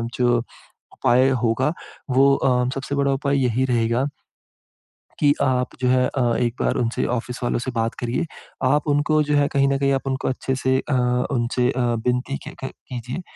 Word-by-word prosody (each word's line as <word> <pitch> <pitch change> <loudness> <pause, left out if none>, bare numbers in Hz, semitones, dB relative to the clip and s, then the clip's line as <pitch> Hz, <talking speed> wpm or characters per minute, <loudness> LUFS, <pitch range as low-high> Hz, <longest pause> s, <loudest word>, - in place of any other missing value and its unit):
जो 120 -1 +3 0.6
उपाय 130 +2 +3
होगा, 130 +7 +1 0.4
वो 135 +2 +5
अ, 125 -1 +1
सबसे 135 +1 -4
बड़ा 140 -1 +2
उपाय 140 +1 0
यही 125 +1 +1
रहेगा 120 0 +1 1.1
कि 145 -2 +4
आप 125 -2 0
जो 125 - +2
है 125 0 +3
अ, 135 - -2 0.2
एक 120 -2 0
बार - - +1
उनसे 120 -1 0
ऑफ़िस 125 +1 -3
वालों 120 - 0
से 130 +1 -4
बात 115 -1 -1
करिए। 125 +7 -1 0.4
आप 145 +4 +2
उनको, 150 +1 +2
जो 150 0 0
है, 145 0 +3
कहीं 140 -1 +3
न 140 - +1
कहीं 140 0 +2
आप 135 0 -2
उनको 130 0 -2
अच्छे-से 130 0 0
अ, - - +1 0.4
उनसे 125 -1 +1
अ, 130 - -2 0.3
विनती 125 +3 0
के - - -6
क - - -1 0.2
कीजिये। 125 +5 -5
130 Hz, 180 wpm, -22 LUFS, 125-140 Hz, 1.1 s, वो